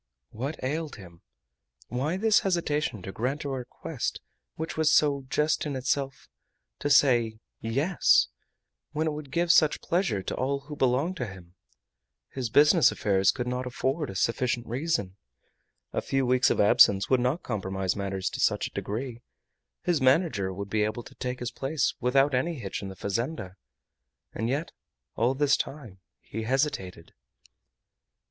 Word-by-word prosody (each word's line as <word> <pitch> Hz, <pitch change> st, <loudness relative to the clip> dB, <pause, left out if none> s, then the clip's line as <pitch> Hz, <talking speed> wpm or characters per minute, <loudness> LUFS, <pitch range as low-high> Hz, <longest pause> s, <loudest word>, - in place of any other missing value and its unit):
What 135 Hz, +8 st, -4 dB
ailed 150 Hz, +3 st, -2 dB
him? 85 Hz, -5 st, -13 dB, 0.7 s
Why 145 Hz, +8 st, -1 dB
this 220 Hz, +1 st, +4 dB
hesitation 150 Hz, -, -1 dB
to 95 Hz, -, -6 dB
grant 130 Hz, +9 st, -2 dB
a 140 Hz, -, -3 dB
request 130 Hz, -2 st, -4 dB, 0.4 s
which 160 Hz, +1 st, -4 dB
was 160 Hz, -1 st, +3 dB
so 140 Hz, -3 st, +3 dB
just 150 Hz, +2 st, +1 dB
in 140 Hz, -, -3 dB
itself 135 Hz, +1 st, -2 dB, 0.5 s
to 145 Hz, -, -1 dB
say 120 Hz, -6 st, +4 dB, 0.2 s
"Yes," 140 Hz, +11 st, +3 dB, 0.7 s
when 155 Hz, +1 st, 0 dB
it 155 Hz, -, +1 dB
would 150 Hz, -2 st, -7 dB
give 170 Hz, +4 st, +2 dB
such 155 Hz, -3 st, +4 dB
pleasure 170 Hz, -, 0 dB
to -, -, -3 dB
all 140 Hz, +2 st, -1 dB
who 150 Hz, +2 st, -9 dB
belonged 140 Hz, +7 st, +1 dB
to 125 Hz, -, -3 dB
him? 90 Hz, -3 st, -12 dB, 0.8 s
His 130 Hz, -4 st, -4 dB
business 150 Hz, -, +6 dB
affairs 95 Hz, -2 st, +2 dB
could 125 Hz, -, 0 dB
not 125 Hz, +1 st, -2 dB
afford 135 Hz, +5 st, -1 dB
a 95 Hz, -, -7 dB
sufficient 120 Hz, +4 st, 0 dB
reason. 120 Hz, -, -2 dB, 0.8 s
A -, -, 0 dB
few 135 Hz, -1 st, 0 dB
weeks 125 Hz, 0 st, +3 dB
of -, -, 0 dB
absence 100 Hz, -2 st, +6 dB
would 130 Hz, -, +5 dB
not 125 Hz, +7 st, 0 dB
compromise 95 Hz, -4 st, -2 dB
matters 95 Hz, -1 st, -3 dB
to -, -, -6 dB
such -, -, +2 dB
a -, -, -6 dB
degree. 120 Hz, +3 st, -4 dB, 0.6 s
His 170 Hz, -5 st, +1 dB
manager 130 Hz, -, +2 dB
would 100 Hz, +1 st, -6 dB
be 110 Hz, -1 st, +2 dB
able 110 Hz, +3 st, -2 dB
to -, -, -14 dB
take 125 Hz, -1 st, -4 dB
his 125 Hz, -, -3 dB
place 135 Hz, 0 st, -1 dB
without 135 Hz, +3 st, +3 dB
any 150 Hz, +7 st, 0 dB
hitch 100 Hz, -9 st, -5 dB
in 100 Hz, -, -5 dB
the 95 Hz, -, -9 dB
fazenda. 100 Hz, -, -3 dB, 0.8 s
And 115 Hz, +2 st, -2 dB
yet 145 Hz, +6 st, -2 dB, 0.4 s
all 125 Hz, +4 st, +1 dB
this 140 Hz, 0 st, +3 dB
time 120 Hz, -10 st, -6 dB, 0.2 s
he 110 Hz, -, -6 dB
hesitated. 115 Hz, -, -2 dB
130 Hz, 160 wpm, -27 LUFS, 110-150 Hz, 0.8 s, business